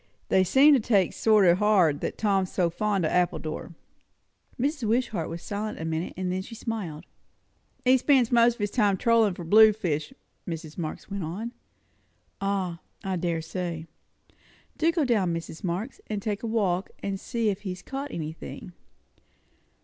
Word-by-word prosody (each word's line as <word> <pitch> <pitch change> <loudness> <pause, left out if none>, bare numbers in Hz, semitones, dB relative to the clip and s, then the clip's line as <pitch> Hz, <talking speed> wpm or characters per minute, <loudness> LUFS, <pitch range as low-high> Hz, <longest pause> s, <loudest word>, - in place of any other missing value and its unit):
They 190 - +4
seem 270 - +6
to 275 - +5
take 205 -5 +2
it - - -16
sort 215 -3 +4
o' 170 - +7
hard, 185 -7 +3
that - - -3
Tom's 195 -3 +1
so 175 -3 +1
fond 200 -1 0
of - - 0
Appledore." 170 -1 -1 0.8
Mrs. 275 -2 -1
Wishart 220 -7 0
was 165 0 -7
silent 210 +1 -4
a 160 - -4
minute, 160 +1 -3
and 185 -1 -2
then 185 +1 -1
she 230 +4 -9
smiled. 190 -9 -5 0.8
"He 255 +1 +6
spends 255 -3 +4 0.3
his 205 -1 -2
time 205 -5 +2
trollin' 225 -3 +3
for 175 - -7
blue 215 +6 +7
fish," 175 - -2 0.4
Mrs. 160 -2 -6
Marx 165 +3 -6
went 200 -2 -3
on. 200 +9 -4 0.9
"Ah, 190 -4 -1 0.2
I 190 -1 -1
dare 170 -2 -1
say. 170 -1 -4 0.9
Do 325 +1 +3
go 330 -4 +1
down, 200 -9 +1
Mrs. 165 -1 -7
Marx, 185 +8 -3
and 210 -2 -2
take 205 0 -3
a 230 - -3
walk, 195 -5 0
and 195 -1 -2
see 230 -1 -1
if 200 0 -3
he 200 - -5
has 180 0 -6
caught 275 +2 -5
anything." 160 - -7
195 Hz, 170 wpm, -27 LUFS, 170-220 Hz, 0.9 s, o